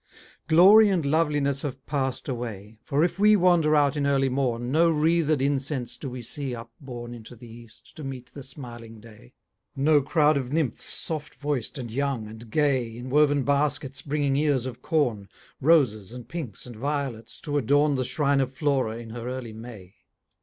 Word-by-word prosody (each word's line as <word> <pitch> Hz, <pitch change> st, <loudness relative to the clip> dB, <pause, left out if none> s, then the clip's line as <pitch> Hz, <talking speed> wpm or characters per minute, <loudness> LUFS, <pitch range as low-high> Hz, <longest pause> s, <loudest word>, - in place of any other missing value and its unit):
Glory 200 Hz, +6 st, +7 dB
and 180 Hz, -6 st, 0 dB
loveliness 145 Hz, -2 st, +1 dB
have 135 Hz, -2 st, -6 dB
passed 135 Hz, -3 st, -2 dB
away; 110 Hz, -4 st, -6 dB
For 145 Hz, +3 st, +1 dB
if 175 Hz, +2 st, -1 dB
we 210 Hz, +1 st, +6 dB
wander 175 Hz, -5 st, +4 dB
out 145 Hz, -1 st, +3 dB
in 145 Hz, -1 st, 0 dB
early 135 Hz, -1 st, +2 dB
morn, 125 Hz, -2 st, -1 dB
No 165 Hz, +3 st, +4 dB
wreathed 155 Hz, -2 st, +2 dB
incense 140 Hz, -2 st, -1 dB
do 135 Hz, -, -6 dB
we 125 Hz, -1 st, -7 dB
see 135 Hz, +2 st, -5 dB
upborne 120 Hz, +1 st, -9 dB
Into 120 Hz, +1 st, -11 dB
the 120 Hz, +1 st, -13 dB
east, 115 Hz, 0 st, -15 dB
to 155 Hz, -, -7 dB
meet 130 Hz, -2 st, -7 dB
the 140 Hz, -, -8 dB
smiling 120 Hz, -4 st, -10 dB
day: 105 Hz, -, -16 dB, 0.4 s
No 145 Hz, +2 st, +4 dB
crowd 150 Hz, +1 st, +3 dB
of 130 Hz, -2 st, -3 dB
nymphs 150 Hz, -6 st, -1 dB
soft 155 Hz, -2 st, -3 dB
voic'd 145 Hz, -2 st, -3 dB
and 120 Hz, -4 st, -6 dB
young, 135 Hz, -2 st, -1 dB
and 110 Hz, +1 st, -11 dB
gay, 130 Hz, -5 st, 0 dB
In 125 Hz, +1 st, -7 dB
woven 145 Hz, -1 st, +3 dB
baskets 145 Hz, 0 st, 0 dB
bringing 145 Hz, -1 st, 0 dB
ears 145 Hz, -4 st, +1 dB
of 125 Hz, -2 st, -7 dB
corn, 120 Hz, -11 st, 0 dB, 0.3 s
Roses, 125 Hz, -, +3 dB
and 125 Hz, -1 st, -9 dB
pinks, 150 Hz, -, -7 dB
and 120 Hz, -2 st, -10 dB
violets, 130 Hz, -3 st, -4 dB
to 145 Hz, -2 st, -1 dB
adorn 145 Hz, +4 st, +3 dB
The 130 Hz, -1 st, 0 dB
shrine 140 Hz, +1 st, +1 dB
of 130 Hz, -1 st, -2 dB
Flora 130 Hz, -5 st, 0 dB
in 115 Hz, -1 st, -9 dB
her 120 Hz, +1 st, -6 dB
early 125 Hz, -3 st, -6 dB
May. 110 Hz, -5 st, -11 dB
135 Hz, 180 wpm, -26 LUFS, 120-150 Hz, 0.4 s, Glory